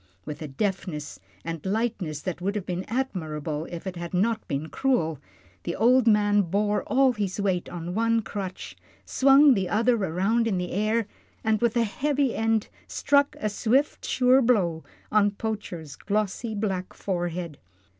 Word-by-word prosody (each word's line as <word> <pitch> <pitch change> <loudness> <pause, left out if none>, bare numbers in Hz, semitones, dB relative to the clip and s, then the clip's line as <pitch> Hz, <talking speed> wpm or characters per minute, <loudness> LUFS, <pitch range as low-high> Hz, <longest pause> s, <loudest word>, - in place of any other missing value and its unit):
With 150 +2 -7
a 155 - -4
deftness 150 - -3 0.3
and 165 -2 -5
lightness 195 -7 -2
that 180 -2 -4
would 200 +3 -1
have 200 -3 -3
been 180 0 -3
admirable 160 - -3
if 170 +1 -7
it 185 -2 -5
had 170 +1 -5
not 220 +4 0
been 145 +2 -2
cruel, 165 - 0 0.4
the 170 - -3
old 245 +3 +4
man 205 -1 +4
bore 205 +3 0
all 270 0 +4
his 205 -3 -3
weight 190 -3 0
on 175 0 -5
one 230 +2 +2
crutch, 195 -2 -6 0.3
swung 275 +1 +6
the 190 -5 -1
other 235 +3 +3
around 200 +5 +1
in 200 -4 0
the 180 0 -3
air, 215 +3 +1 0.4
and 220 0 +1
with 235 -1 +2
the 235 - +3
heavy 275 +4 0
end 225 -1 +1 0.2
struck 285 0 +2
a 215 - -1
swift, 245 +7 +1
sure 255 +1 +4
blow 185 -10 +2 0.3
on 205 -1 +4
Poacher's 200 -8 -5
glossy 215 +2 -2
black 190 -3 -3
forehead. 175 -4 -3
205 Hz, 160 wpm, -26 LUFS, 175-230 Hz, 0.4 s, swung